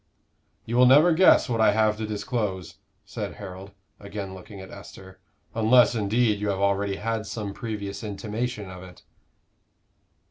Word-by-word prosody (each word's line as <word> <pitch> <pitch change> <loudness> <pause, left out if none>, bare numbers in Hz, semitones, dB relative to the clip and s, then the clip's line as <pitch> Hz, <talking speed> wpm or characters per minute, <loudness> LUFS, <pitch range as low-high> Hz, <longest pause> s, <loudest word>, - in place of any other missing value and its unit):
"You 120 +2 -2
will 125 0 +7
never 150 +7 +6
guess 185 +3 +5
what 115 -2 -1
I 110 - +5
have 110 0 +2
to 110 0 -4
disclose," 100 -5 -3 0.3
said - - -6
Harold, 95 -1 -9 0.3
again 100 -1 -7
looking 95 +2 -11
at 95 - -10
Esther, 95 -1 -12 0.3
"unless, 115 +3 +4
indeed, 110 0 +1
you 105 0 -2
have 100 - -1
already 100 0 0
had 110 +1 -3
some 105 -3 -5
previous 105 -3 -6
intimation 105 +1 -4
of 90 -1 -10
it." 90 -1 -14
105 Hz, 150 wpm, -25 LUFS, 100-115 Hz, 0.3 s, will